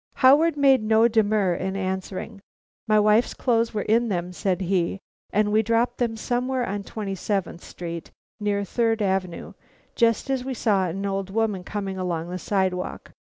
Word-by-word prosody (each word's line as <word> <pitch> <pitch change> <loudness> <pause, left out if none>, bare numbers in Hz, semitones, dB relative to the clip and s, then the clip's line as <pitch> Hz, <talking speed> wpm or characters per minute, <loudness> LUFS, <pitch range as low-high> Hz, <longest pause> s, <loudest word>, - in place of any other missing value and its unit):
Howard 295 +5 +5
made 270 -3 +5
no 220 +1 +4
demur 215 -4 +2
in 190 +2 -3
answering. 190 +2 -4 0.5
"My 215 -1 +4
wife's 215 +3 +3
clothes 230 -2 +1
were 210 -2 -2
in 230 +2 +2
them," 180 -2 -2
said 190 +1 -1
he, 185 0 0 0.3
"and 210 0 +2
we 215 +1 +4
dropped 230 +2 0
them 230 -2 0
somewhere 250 +2 -1
on 205 +1 -3
Twenty 200 -1 -5
seventh 190 -3 -3
Street 170 -1 -7 0.3
near 205 -1 0
Third 225 +1 0
Avenue, 190 -3 -2 0.4
just 230 +2 +2
as 265 -2 0
we 260 0 -4
saw 200 -5 +1
an 195 +4 -4
old 195 -1 -2
woman 210 -2 -1
coming 195 -1 -4
along 175 -2 -3
the 185 - -4
sidewalk. 185 -1 -2
205 Hz, 165 wpm, -24 LUFS, 190-230 Hz, 0.5 s, Howard